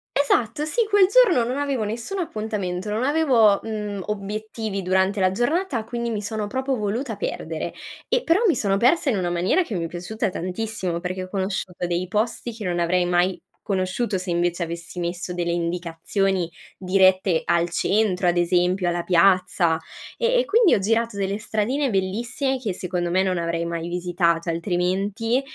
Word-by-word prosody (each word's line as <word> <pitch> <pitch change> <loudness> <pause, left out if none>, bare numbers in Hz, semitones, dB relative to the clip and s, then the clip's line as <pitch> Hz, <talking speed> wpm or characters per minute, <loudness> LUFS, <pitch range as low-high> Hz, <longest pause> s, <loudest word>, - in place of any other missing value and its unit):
Esatto, 280 -1 +1
sì, 310 +10 0
quel 405 -2 +6
giorno 400 - +5
non 250 +3 -2
avevo 280 -5 -1
nessun 235 - -4
appuntamento, 210 - -3
non 220 +4 -1
avevo, 260 -9 +4
mhmm, 210 -3 -4
obiettivi 210 0 -4
durante 190 +2 +1
la 185 0 +3
giornata, 250 - 0
quindi 235 0 -3
mi 215 -3 -2
sono 210 0 -3
proprio 260 +4 -1
voluta 225 +2 -2
perdere. 200 - -4 0.4
E - - +2
però 335 +5 +3
mi 360 - +4
sono 195 -2 +1
persa 265 +8 +3
in 240 - +1
una 180 -2 -1
maniera 175 - +2
che 240 - -7
mi 170 -2 -1
è - - -3
piaciuta 180 +6 -3
tantissimo 185 -1 -3
perché 185 +1 -4
ho 185 - -9
conosciuto 190 -2 -3
dei 175 +1 -1
posti 225 +3 -1
che 220 -2 -7
non 175 -1 -1
avrei 175 +1 +2
mai 175 0 +1 0.2
conosciuto 190 +2 -1
se 185 0 -4
invece 175 0 0
avessi 170 +1 -6
messo 175 +1 -3
delle 175 -1 -1
indicazioni 175 +2 -1 0.3
dirette 185 -2 +3
al 170 0 +2
centro, 195 0 +1
ad 175 - +3
esempio, 180 +1 +2
alla 175 0 -1
piazza 180 -2 +3 0.4
e - - +2
e - - +1
quindi 455 -5 +4
ho - - +4
girato 225 +2 0
delle 200 0 -1
stradine 230 +7 -1
bellissime 235 +7 -1
che 220 -7 -2
secondo 180 -1 -2
me 185 +2 +3
non 185 -1 0
avrei 170 0 -1
mai 170 0 -3
visitato 175 -1 0
altrimenti, 195 +8 0
195 Hz, 170 wpm, -23 LUFS, 180-230 Hz, 0.4 s, quel